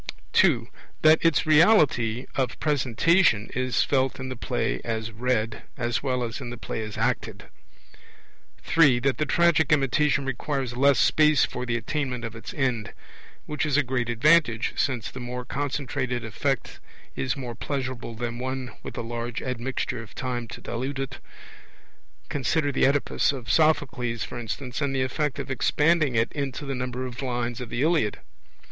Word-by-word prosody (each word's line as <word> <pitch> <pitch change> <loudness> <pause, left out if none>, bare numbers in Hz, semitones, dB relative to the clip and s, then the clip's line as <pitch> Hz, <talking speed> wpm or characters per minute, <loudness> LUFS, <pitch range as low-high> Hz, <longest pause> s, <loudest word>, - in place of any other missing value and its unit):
(2) - - +4 0.4
That 155 +1 +6
its 165 -2 +3
reality 150 - +4
of 130 -2 -1
presentation 140 - +2
is 130 0 +1
felt 135 -1 0
in 130 0 -5
the 130 - -4
play 60 - -2
as 115 -1 -3
read, 115 -1 -1 0.2
as 120 -1 -1
well 125 -3 -1
as 115 +3 -4
in 125 - -5
the 120 - -6
play 110 - -4
as 110 -1 -6
acted. - - -2 1.1
(3) 145 -7 +5
That 130 +2 0
the 150 - 0
tragic 165 -1 +3
imitation 140 0 +2
requires 135 -1 -2
less 140 +2 +4
space 155 -2 +4
for 125 0 -5
the 120 - 0
attainment 125 -1 -3
of 115 0 -6
its 115 - -8
end; 125 -6 -1 0.5
which 150 -1 -2
is 150 -3 +1
a 150 - +4
great 125 -2 -1
advantage, 120 -1 +3
since 130 -3 -1
the 130 - -8
more 125 0 -5
concentrated 130 -3 -2
effect 120 +2 -2 0.4
is 130 +2 -1
more 125 -3 -5
pleasurable 130 -2 -4
than 120 +1 -4
one 130 0 -4
with - - -8
a - - -1
large 120 +1 -4
admixture 125 -1 -3
of 115 - -13
time 120 -2 -3
to - - -9
dilute 130 +4 -4
it 135 -1 -4 1.1
consider 145 - 0
the 135 - +3
Oedipus 140 +1 +2
of 130 -4 -4
Sophocles, 130 -7 +2
for 125 - -6
instance, 125 +3 -5
and 140 -2 0
the 130 - +2
effect 145 +2 -1
of - - -4
expanding 150 +1 +2
it 115 0 +2
into 140 0 -4
the 135 - -3
number 125 0 -3
of 125 0 -6
lines 120 -2 -2
of 125 - -6
the 120 - -1
Iliad. 155 -10 +2
130 Hz, 165 wpm, -26 LUFS, 120-145 Hz, 1.1 s, That